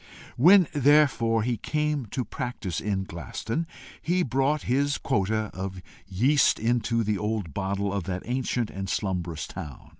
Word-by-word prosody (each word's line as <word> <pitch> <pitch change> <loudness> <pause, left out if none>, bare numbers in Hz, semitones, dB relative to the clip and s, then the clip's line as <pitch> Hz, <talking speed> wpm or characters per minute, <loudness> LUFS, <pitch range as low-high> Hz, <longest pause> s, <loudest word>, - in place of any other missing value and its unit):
When 180 +6 +7
therefore 140 -6 +4
he 120 0 0
came 150 -3 -1
to 125 +4 -3
practise 110 -9 -4
in 100 -2 -1
Glaston, 100 - -4 0.3
he 180 +2 +1
brought 135 +2 +1
his 140 +3 +1
quota 110 +1 0
of 95 0 -5 0.3
yeast 125 +10 +3
into 115 0 +1
the 105 -2 -1
old 105 -7 -2
bottle 100 0 -2
of 100 -4 -2
that 90 0 -4
ancient 125 -2 -1
and 95 0 -5
slumberous 90 -7 -2
town. 75 -3 -9
115 Hz, 145 wpm, -26 LUFS, 95-135 Hz, 0.3 s, When